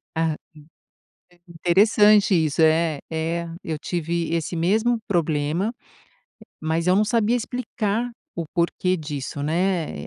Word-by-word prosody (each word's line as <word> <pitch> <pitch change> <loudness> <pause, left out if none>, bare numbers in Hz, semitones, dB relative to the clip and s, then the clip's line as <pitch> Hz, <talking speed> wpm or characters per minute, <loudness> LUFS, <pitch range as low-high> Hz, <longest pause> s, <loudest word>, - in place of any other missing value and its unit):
Ah 160 -1 0 1.1
É, 175 - -14
interessante 205 +4 +4
isso. 160 -3 +1
É, 160 -1 +3
é. 165 +1 -2 0.2
Eu 160 -2 -3
tive 170 0 -2
esse 165 +1 -2
mesmo 220 +8 +2
problema, 165 +3 0 0.9
mas 160 +2 -1
eu 185 - +4
não 210 - +4
sabia 230 +1 +2
explicar 240 -1 -2 0.2
o 170 - -3
porquê 180 +1 0
disso, 145 -3 -5
né. 165 - -1
170 Hz, 120 wpm, -23 LUFS, 160-205 Hz, 1.1 s, interessante